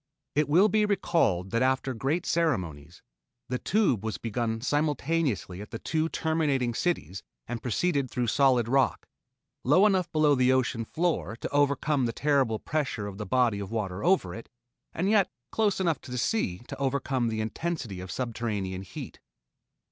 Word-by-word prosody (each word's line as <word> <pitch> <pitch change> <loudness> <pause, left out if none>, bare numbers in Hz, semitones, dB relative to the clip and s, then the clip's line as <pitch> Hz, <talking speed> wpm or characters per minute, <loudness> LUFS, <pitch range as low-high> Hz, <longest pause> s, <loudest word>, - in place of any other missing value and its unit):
It 150 -1 +1
will 180 +8 +6
be 215 0 +2
recalled 170 - +1
that 115 +1 +1
after 130 0 +1
great 140 +9 -1
ceremonies, 95 - -1 0.5
the 125 0 -1
Tube 185 - +1
was 110 -1 -3
begun 115 0 -2
simultaneously 145 - -1
at 105 - -9
the 115 - -5
two 160 +6 -1
terminating 150 -8 0
cities 100 - -2 0.3
and 120 -1 -4
proceeded 140 +2 0
through 125 +1 -1
solid 125 -1 +3
rock 135 +2 +1 0.6
low 150 +10 +5
enough 185 -4 +2
below 155 -2 +4
the 130 -1 +4
ocean 125 -3 0
floor 160 -7 -1
to - - -5
overcome 145 -1 +2
the 115 - -3
terrible 135 -6 +2
pressure 135 -6 -2
of 100 0 -7
the 105 - -4
body 125 -5 +2
of 100 -1 -5
water 100 -4 -3
over 175 - +2
it, 115 - -9 0.4
and 180 +4 -1
yet 205 -2 +4 0.2
close 210 -3 +1
enough 170 -5 0
to - - -12
the 125 - -4
sea 120 - -1
to 140 - -6
overcome 135 -2 0
the 110 -1 -2
intensity 115 - -3
of 90 0 -7
subterranean 105 -3 -3
heat. 95 - -9
130 Hz, 165 wpm, -28 LUFS, 110-160 Hz, 0.6 s, will